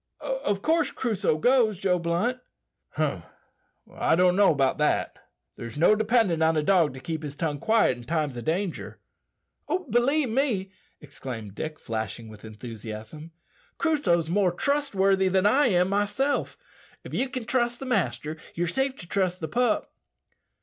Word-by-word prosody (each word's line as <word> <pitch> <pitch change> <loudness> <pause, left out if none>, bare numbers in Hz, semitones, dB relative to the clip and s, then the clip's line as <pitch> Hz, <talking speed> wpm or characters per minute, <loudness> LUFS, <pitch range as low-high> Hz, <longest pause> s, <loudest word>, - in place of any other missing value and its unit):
Of - - -2
course 330 +1 +2
Crusoe 210 -9 -1
goes, 235 +1 +3
Joe 180 -1 +1
Blunt?" 175 +10 -1 0.5
"Hum! - - -1 0.7
I - - +2
don't 180 +1 +4
know 200 -1 +5
that. 140 +2 +1 0.4
There's 115 +2 -8
no 170 +7 +5
dependin' 215 -6 +2
on 160 0 +3
a 155 - +1
dog 165 -6 +3
to - - -8
keep 160 +4 -4
his 145 -2 -6
tongue 150 -2 -2
quiet 220 - +3
in - - -10
times 150 -2 -1
o' 120 - -5
danger." 170 +6 -3 0.9
"Believe 270 +3 +2
me," 220 -6 0 0.3
exclaimed 125 -8 -8
Dick, 155 +8 -5
flashing 110 0 -5
with 105 -1 -13
enthusiasm, 110 +5 -8 0.5
"Crusoe's 195 - +1
more 185 +1 +2
trustworthy 195 -5 +1
than 190 +1 +2
I 270 +7 +4
am 180 -4 +2
myself. 210 +8 0 0.5
If - - -10
ye 270 - 0
can 255 -3 -5
trust 240 0 0
the 270 - -6
master, 155 - -1 0.2
ye're 175 - 0
safe 265 +9 -1
to 170 - -11
trust 185 -1 0
the 160 - -4
pup." 240 +1 0
185 Hz, 150 wpm, -26 LUFS, 150-235 Hz, 0.9 s, know